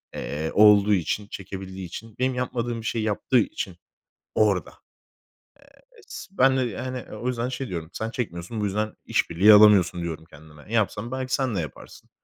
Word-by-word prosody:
eee, 75 +3 -4
olduğu 105 0 +6
için, 100 +3 -1
çekebildiği 95 -2 -7
için, 110 +5 -9
benim 130 0 +1
yapmadığım 120 -2 -2
bir - - -11
şeyi 110 -2 -1
yaptığı 110 +4 +2
için 305 +4 -3 0.6
orada. - - +2 1.3
Eee, 455 - -17
s - - -8
ben 135 0 +5
de 130 - +2
yani, 125 +2 -4
o 120 +4 -5
yüzden 125 0 -1
şey 130 +1 -4
diyorum; 85 -3 -5
"Sen 110 - -3
çekmiyorsun, 105 -1 -4
bu - - 0
yüzden 105 +2 -2
iş - - 0
birliği 95 +6 +6
alamıyorsun." 100 -5 +6
diyorum 80 -1 -5
kendime. 75 +5 -14
"Yapsan, 110 +1 0
belki 130 0 -4
sen 130 -6 0
de - - 0
yaparsın." 75 -5 -10
105 Hz, 170 wpm, -25 LUFS, 90-125 Hz, 1.3 s, olduğu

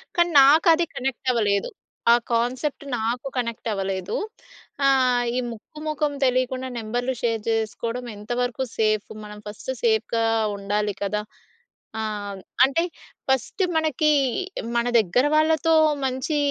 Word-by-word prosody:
కానీ 345 0 +3
నాకది 320 +4 +6
కనెక్టవ్వలేదు. 235 - 0 0.4
ఆ - - +9 0.2
కాన్సెప్ట్ 250 +5 -1
నాకు 235 +4 -2
కనెక్టవ్వలేదు. 195 -6 -2 0.7
ఆహ్, 255 -2 +4
ఈ - - +1
ముక్కు 265 +7 -11
మొఖం 300 -1 -1
తెలికుండా 255 0 0
నెంబర్‌లు 245 +3 -2
షేర్ 230 -2 0
జేసుకోవడం 230 +2 -2
ఎంతవరకు 245 +4 -2
సేఫు. 215 -1 +1
మనం 210 0 -9
ఫస్ట్ 210 +5 -6
సేఫ్‌గా 225 0 +2 0.3
ఉండాలి 205 +1 -1
కదా! 210 +1 -1 0.8
ఆహ్, 205 -2 -4 0.2
అంటే 275 +6 +3 0.5
ఫస్ట్ 265 - 0
మనకి 310 -1 +2 0.6
మన 235 0 +2
దగ్గర 220 +7 +2
వాళ్ళతో 315 +1 +3 0.3
మంచి 260 +4 -1
245 Hz, 110 wpm, -24 LUFS, 215-270 Hz, 0.8 s, ఆ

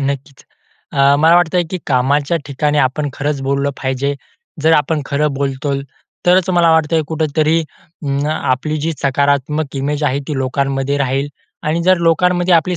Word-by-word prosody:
नक्कीच. 140 0 -6 0.5
अ, 140 +1 +4
मला 160 +3 +5
वाटतंय, 175 0 +2
की 185 - -3
कामाच्या 140 +4 +1
ठिकाणी 145 +2 0
आपण 145 +2 +1
खरंच 145 0 -2
बोललं 140 +1 0
पाहिजे. 135 +2 -1 0.5
जर 160 +1 +4
आपण 150 +1 +2
खरं 150 +1 +1
बोलतो 140 0 -2 0.4
तरच 180 +1 +4
मला 175 -2 +4
वाटतंय 160 0 +2
कुठेतरी 155 0 +1
अं, 145 -2 -5
आपली 155 0 -1
जी 165 +2 -1
सकारात्मक 140 +1 0
इमेज 145 +2 -2
आहे 140 -1 +1
ती 150 - -2
लोकांमध्ये 135 +1 -1
राहील. 135 +1 0 0.3
आणि 160 +3 -1
जर 185 +1 +4
लोकांमध्ये 175 +2 +3
आपली 170 +2 +2
145 Hz, 150 wpm, -17 LUFS, 140-160 Hz, 0.5 s, मला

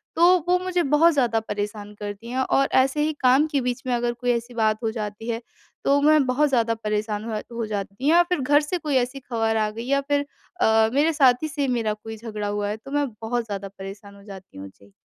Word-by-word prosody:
तो 355 +2 +6
वो 360 0 +4
मुझे 360 -1 0
बहुत 325 +3 +5
ज़्यादा 240 -6 +2
परेशान 210 -1 -5
करती 205 +2 -7
हैं। 255 +2 -2
और 270 +1 +2
ऐसे 270 +3 0
ही 310 +1 +1
काम 265 +4 +4
के 280 -3 +1
बीच 250 +1 -2
में 250 - +1
अगर 240 0 -1
कोई 245 +1 -1
ऐसी 235 +1 -3
बात 220 -2 +1
हो 225 - 0
जाती 215 0 -6
है 230 0 -2 0.4
तो 280 +1 +4
मैं 300 -1 +5
बहुत 285 +4 +2
ज़्यादा 230 -3 +2
परेशान 215 -1 -3
हो 215 -1 -2 0.2
हो 230 - -1
जाती 200 -2 -4
हूँ। - - +4
या 345 +1 +6
फिर 360 - +1
घर 290 +3 +4
से 300 +5 -2
कोई 300 -4 -2
ऐसी 255 +2 -1
ख़बर 225 -3 -1
आ 215 -1 +1
गई 230 +2 -7
या 280 0 +2
फिर 285 0 +1 0.4
अ, 220 0 +4
मेरे 305 +4 +3
साथी 270 -1 +3
से 280 -1 -2
मेरा 230 -4 0
कोई 220 +1 -9
झगड़ा 215 -2 -5
हुआ 205 0 -2
है 210 - -3
तो 245 +5 -13
मैं 290 0 +1
बहुत 235 +1 -2
ज़्यादा 200 -2 -5
परेशान 195 +1 -9
हो 200 - -16
जाती 195 - -12
हूँ। 95 0 -8
जी। 100 +1 -22
235 Hz, 240 wpm, -24 LUFS, 215-280 Hz, 0.4 s, तो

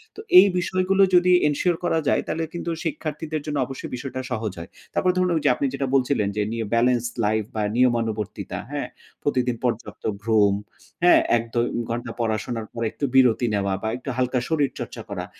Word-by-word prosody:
তো - - -11 0.2
এই 200 - +7
বিষয়গুলো 185 +2 +2
যদি 180 +1 +5 0.2
এনশিওর 165 +4 +1
করা 165 -2 +1
যায়, - - +3
তাহলে 165 - -2
কিন্তু 170 0 -3
শিক্ষার্থীদের 155 -1 -3
জন্য 150 -1 -2
অবশ্যই 135 +1 -7
বিষয়টা 130 +1 -5
সহজ 110 -3 -2
হয়। 85 - -8 0.2
তারপরে 180 -1 +2
ধরুন 185 0 +2
ওই 160 - 0
যে - - +6
আপনি 140 - -1
যেটা 140 0 -2
বলছিলেন 125 -5 +2
যে, 105 - 0
নিউ 115 -1 -2
বেলেন্স 120 0 +2 0.2
লাইফ 110 +1 +1
বা 110 - 0
নিয়মানুবর্তিতা, 115 -4 0
হ্যাঁ? - - -3 0.4
প্রতিদিন 125 -3 +1
পর্যাপ্ত 120 -2 -3 0.2
ঘুম, 105 -3 +4 0.5
হ্যাঁ? 175 - +7 0.2
১-২ 115 +1 -1 0.2
ঘন্টা 120 +1 -3
পড়াশোনার 110 0 -2
পর, 115 - -6
একটু 145 - -3
বিরতি 125 -2 +5
নেওয়া 100 -1 0
বা 110 - -3
একটু 125 - -7
হালকা 125 0 +1
শরীর 150 -4 +2
চর্চা - - -6
করা। - - -4
125 Hz, 180 wpm, -23 LUFS, 115-155 Hz, 0.5 s, এই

